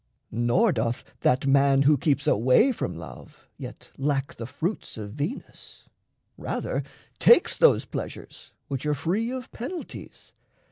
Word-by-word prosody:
Nor 120 - +2
doth 115 -3 -1 0.2
that 125 +2 +2
man 140 0 +4
who 150 +2 +5
keeps 140 +1 0
away 130 - +4
from 90 - -4
love 80 -1 -12
Yet - - -10
lack 140 -1 -1
the 115 - -7
fruits 170 - -4
of 105 -2 -6
Venus; 150 - -6 0.6
rather - - -2 0.4
takes 475 - +6
Those 485 - +4
pleasures - - -8 0.2
which 135 -2 -4
are 150 - +1
free 190 - -1
of 255 -1 -6
penalties. 325 +9 -8
140 Hz, 135 wpm, -26 LUFS, 125-210 Hz, 0.6 s, takes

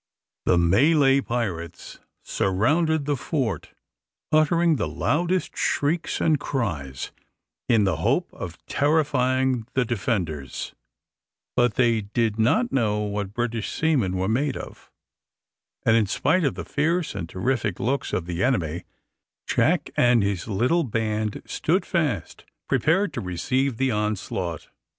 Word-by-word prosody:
The 90 - +4
Malay 135 - +4
pirates 95 -10 -4 0.2
surrounded 145 - +1
the 145 0 +1
fort, 120 - -2 0.6
uttering 160 +1 +3
the 110 - -1
loudest 170 +6 0
shrieks 160 +4 0
and 155 -3 +2
cries, 75 - -3 0.6
in 115 -3 +4
the 95 -6 +1
hope - - 0
of - - -7
terrifying 130 -5 +1
the 130 -1 +2
defenders, 95 - -3 0.8
but 120 -3 +2
they 115 -3 +3
did 110 +1 -1
not 215 - +2
know 105 -5 +1
what 105 -1 -3
British 120 -3 -2
seamen 130 - +1
were 95 +1 0
made 135 +7 0
of; - - -10 1.0
and 110 - +5
in 110 -3 +3
spite 165 - +1
of 140 - 0
the - - -6
fierce 165 +3 0
and 85 -4 -5
terrific 105 -1 -1
looks 135 +6 -1
of 85 - -1
the 85 +2 -2
enemy, 85 - 0 0.6
Jack - - +1
and 120 -3 +4
his 100 -2 -2
little 125 - +2
band 110 -3 -2
stood 180 +5 0
fast, 145 - -2 0.2
prepared 180 +2 +2
to 125 - -3
receive 120 +8 -1
the 130 +1 +1
onslaught. 100 -6 -2
120 Hz, 130 wpm, -24 LUFS, 100-145 Hz, 1.0 s, and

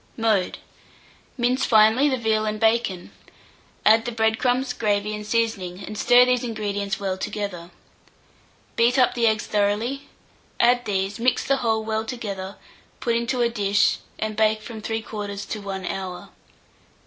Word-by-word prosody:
Mode. 220 -5 +1 0.8
Mince 250 +2 +1
finely 225 +5 +5
the 260 - 0
veal 220 -2 +1
and 215 0 -2
bacon; 220 -5 +1 0.7
add 225 +1 +5
the 240 - -2
bread 220 -1 +1
crumbs, 250 0 +1
gravy, 210 -2 0
and 210 0 -6
seasoning, 200 -5 -1
and 215 - -7
stir 245 +3 +6
these 250 0 +1
ingredients 205 -3 -3
well 190 -2 -3
together. 185 -5 -5 1.1
Beat 240 +3 +3
up 255 -2 +4
the 235 -1 +2
eggs 220 -1 +1
thoroughly; 215 +7 -1 0.5
add 245 0 +3
these, 195 0 -2
mix 250 +2 +1
the 275 - +1
whole 225 -3 0
well 220 0 -1
together, 200 -5 -6 0.4
put 235 -2 0
into 235 +2 -1
a 235 - +3
dish, 205 -2 +2 0.2
and 215 0 -3
bake 215 0 +2
from 220 -1 -8
3/4 210 -2 -5
to 215 - -4
1 195 -2 -5
hour. 185 -2 -5
220 Hz, 150 wpm, -23 LUFS, 205-235 Hz, 1.1 s, stir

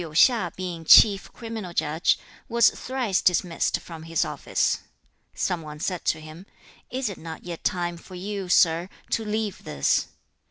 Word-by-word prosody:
Hui 170 - -5
of 155 - -12
Liu - - -13
hsia 190 -1 +4
being 180 -3 -5
chief 195 +4 +7
criminal 225 -6 -7
judge, 155 +1 +1 0.3
was 235 0 +5
thrice 250 -7 -1
dismissed 175 -1 +1
from 165 -2 -10
his 165 0 0
office. - - 0 0.6
Some 180 -3 -1
one 150 -1 -9
said 180 +2 -3
to 160 - +1
him, 155 +5 -11 0.4
'Is 260 0 -2
it 200 - -6
not 160 0 -8
yet 175 -2 -7
time 175 -1 -1
for 185 +2 -12
you, 195 0 -5
sir, 170 0 +4 0.2
to 225 - +1
leave 215 -2 -3
this?' 70 - +1
180 Hz, 170 wpm, -25 LUFS, 165-210 Hz, 0.6 s, chief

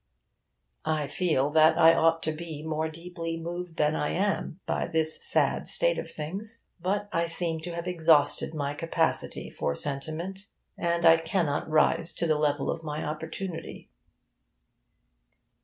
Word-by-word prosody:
I 155 -2 +1
feel 145 -2 0
that 155 +1 +5
I 165 0 +7
ought 165 0 +3
to 155 - 0
be 155 -1 -7
more 160 0 -2
deeply 165 0 -5
moved 175 0 -5
than 150 0 +2
I 150 - -1
am 195 -2 -1
by - - -1
this 160 -1 +1
sad - - +2
state - - +1
of - - -6
things. 200 +9 -6 0.2
But 200 +3 -1
I 170 0 +1
seem 165 -1 -1
to 170 +1 -6
have 170 0 -4
exhausted 160 -3 +3
my 145 -1 -2
capacity 165 +1 -1
for 70 - -2
sentiment; 160 - -3 0.3
and 170 0 0
I 165 0 +8
cannot 165 -3 -1
rise 155 +2 +2
to - - -1
the 155 -2 +2
level 145 -2 +1
of - - -5
my 150 -1 -4
opportunity. 160 +3 -6
165 Hz, 150 wpm, -28 LUFS, 155-170 Hz, 0.3 s, I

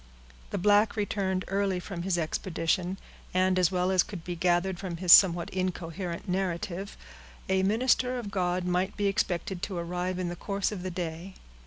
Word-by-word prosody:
The - - -3
black 205 +3 +4
returned 195 -3 -1
early 195 -1 0
from 180 -1 -6
his 180 0 0
expedition, 175 +2 -1 0.4
and, 185 0 +3
as 180 0 +3
well 180 0 +1
as 185 -1 +5
could 190 -3 -6
be 175 0 -4
gathered 175 +1 +1
from 180 -3 -5
his 175 0 +7
somewhat 175 -3 +6
incoherent 180 -1 -4
narrative, 185 +1 -3 0.5
a 190 0 +2
minister 250 +5 +2
of 220 -5 -5
God 180 -1 0
might 180 +2 0
be 205 - 0
expected 185 -2 -1
to 190 -2 -3
arrive 180 +2 -2
in 180 -1 -2
the 175 - -5
course 200 +3 -2
of 200 -4 -5
the 185 - -4
day. 175 +1 -5
185 Hz, 175 wpm, -28 LUFS, 175-195 Hz, 0.5 s, his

